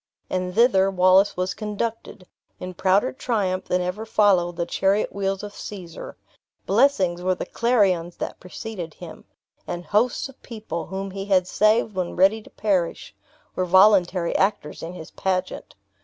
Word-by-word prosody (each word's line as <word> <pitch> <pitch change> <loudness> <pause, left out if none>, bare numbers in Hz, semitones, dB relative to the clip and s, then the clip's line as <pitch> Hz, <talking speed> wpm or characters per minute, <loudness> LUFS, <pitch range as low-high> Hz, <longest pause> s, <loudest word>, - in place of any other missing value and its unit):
And 180 0 -2
thither 210 -5 +4
Wallace 185 +1 +4
was 185 +1 -1
conducted, 215 -2 -5 0.3
in 185 0 -6
prouder 190 +6 +2
triumph 205 -8 -1
than 180 - 0
ever 180 +5 -3
followed 195 -6 +2
the 170 - -2
chariot 195 +4 0
wheels 195 -1 -2
of 205 0 -7
Caesar. 180 -6 -9 0.5
Blessings 185 -11 +2
were 185 +1 +1
the - - -5
clarions 195 -8 +1
that - - -5
preceeded 180 -3 -7
him; 165 -3 -11 0.4
and 175 0 -5
hosts 220 - +1
of 270 - -17
people, 215 -8 -6
whom 195 +1 -5
he 195 0 -5
had 190 -3 +3
saved 215 +3 +2
when 185 -2 -3
ready 195 +4 +3
to - - -16
perish, 190 -5 -1 0.4
were 185 - 0
voluntary 185 -1 +4
actors 195 -6 -1
in 165 +2 -6
his 160 -3 -10
pageant. 185 -1 -3
190 Hz, 155 wpm, -23 LUFS, 180-210 Hz, 0.5 s, thither